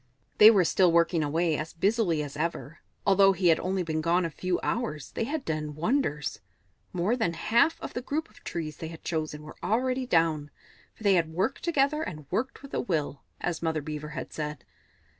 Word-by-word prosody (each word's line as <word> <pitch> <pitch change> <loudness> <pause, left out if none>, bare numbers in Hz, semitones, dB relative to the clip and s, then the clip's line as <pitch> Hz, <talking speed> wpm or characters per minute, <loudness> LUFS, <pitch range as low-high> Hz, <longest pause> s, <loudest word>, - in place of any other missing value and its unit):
They 210 - +11
were 195 -5 +5
still 180 +1 +4
working 170 -1 +3
away, 160 +2 +1
as 155 +2 -5
busily 185 -4 +1
as 145 -1 -7
ever. 155 -1 -3 0.3
Although 195 0 +6
he 180 -1 +2
had 160 - +4
only 185 0 -1
been 160 -1 -2
gone 170 +2 +2
a 165 - -3
few 180 +3 -1
hours, 220 - -2
they 225 - -2
had 300 +2 -3
done 150 -2 -3
wonders; 155 - -1 0.5
more 185 +6 +1
than 220 -9 0
half 235 - +2
of - - -7
the 245 - -3
group 305 +5 -2
of - - -21
trees 155 -3 -4
they 160 - -5
had 165 0 -10
chosen 155 -2 -3
were 155 - -11
already 255 +5 0
down, 160 -6 +2 0.5
for - - -14
they 200 -2 +5
had 165 -3 +2
"worked 185 +11 -1
together, 300 -2 +2
and 155 - -6
worked 260 +4 -2
with 275 - -11
a - - 0
will," 150 - -2 0.2
as 175 -2 -2
Mother 160 -2 -1
Beaver 150 0 -5
had 150 -4 -6
said. 150 -1 -5
170 Hz, 200 wpm, -28 LUFS, 155-220 Hz, 0.5 s, They